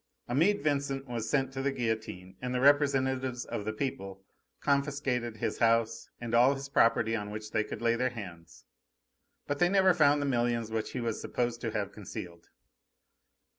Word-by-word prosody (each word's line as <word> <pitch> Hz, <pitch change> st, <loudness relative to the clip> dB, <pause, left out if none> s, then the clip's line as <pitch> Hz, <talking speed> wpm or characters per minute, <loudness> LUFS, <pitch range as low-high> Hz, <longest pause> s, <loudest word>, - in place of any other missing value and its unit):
Amede 170 Hz, +12 st, +2 dB
Vincent 140 Hz, -2 st, 0 dB
was 115 Hz, -3 st, -3 dB
sent 135 Hz, -1 st, +1 dB
to 135 Hz, -, -3 dB
the 140 Hz, +1 st, +1 dB
guillotine, 110 Hz, -7 st, -3 dB
and 125 Hz, 0 st, -3 dB
the -, -, +1 dB
representatives 130 Hz, -3 st, +2 dB
of 100 Hz, -, -5 dB
the 110 Hz, -, -1 dB
people 95 Hz, -5 st, -5 dB, 0.3 s
confiscated 140 Hz, -5 st, 0 dB
his -, -, -2 dB
house 115 Hz, 0 st, +2 dB
and 120 Hz, -1 st, -5 dB
all 125 Hz, +4 st, +5 dB
his 135 Hz, 0 st, -7 dB
property 115 Hz, -3 st, +3 dB
on 105 Hz, -2 st, -4 dB
which 105 Hz, 0 st, -7 dB
they 110 Hz, -, +1 dB
could 110 Hz, -, -7 dB
lay 115 Hz, 0 st, +3 dB
their 125 Hz, +2 st, +1 dB
hands; 90 Hz, -9 st, -10 dB, 0.8 s
but 145 Hz, 0 st, -2 dB
they 175 Hz, -, +4 dB
never 190 Hz, -1 st, +5 dB
found 145 Hz, -4 st, +4 dB
the 145 Hz, -, -1 dB
millions 120 Hz, -3 st, 0 dB
which 110 Hz, -1 st, -3 dB
he 125 Hz, -, -3 dB
was 115 Hz, -2 st, -2 dB
supposed 120 Hz, -1 st, -2 dB
to 115 Hz, -, -2 dB
have 105 Hz, -2 st, -3 dB
concealed. 85 Hz, -4 st, -9 dB
120 Hz, 175 wpm, -30 LUFS, 110-140 Hz, 0.8 s, all